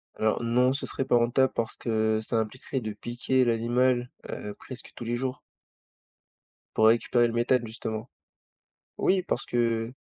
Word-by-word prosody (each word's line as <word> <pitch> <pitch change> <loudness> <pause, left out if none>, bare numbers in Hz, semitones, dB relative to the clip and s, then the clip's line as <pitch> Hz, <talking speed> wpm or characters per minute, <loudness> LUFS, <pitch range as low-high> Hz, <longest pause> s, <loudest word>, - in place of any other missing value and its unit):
Alors, 110 0 +1
non, 125 +2 +3
ce 135 - -3
serait 135 - -3
pas 130 - +3
rentable 120 +3 +3
parce 115 -1 -2
que 110 -1 +1
ça 115 +1 -1
impliquerait 125 +4 -3
de 110 -2 -4
piquer 120 +4 0
l'animal, 120 +2 +2 0.2
heu, 105 - -5
presque 130 -1 -9
tous - - -7
les 120 +1 -1
jours. 130 +1 -3 1.3
Pour 110 - +5
récupérer 120 +1 +4
le 115 - -4
méthane 120 +1 +2
justement. 110 +1 -5 0.9
Oui, 190 -1 +3
parce - - -2
que 115 -1 0
120 Hz, 155 wpm, -27 LUFS, 115-125 Hz, 1.3 s, Pour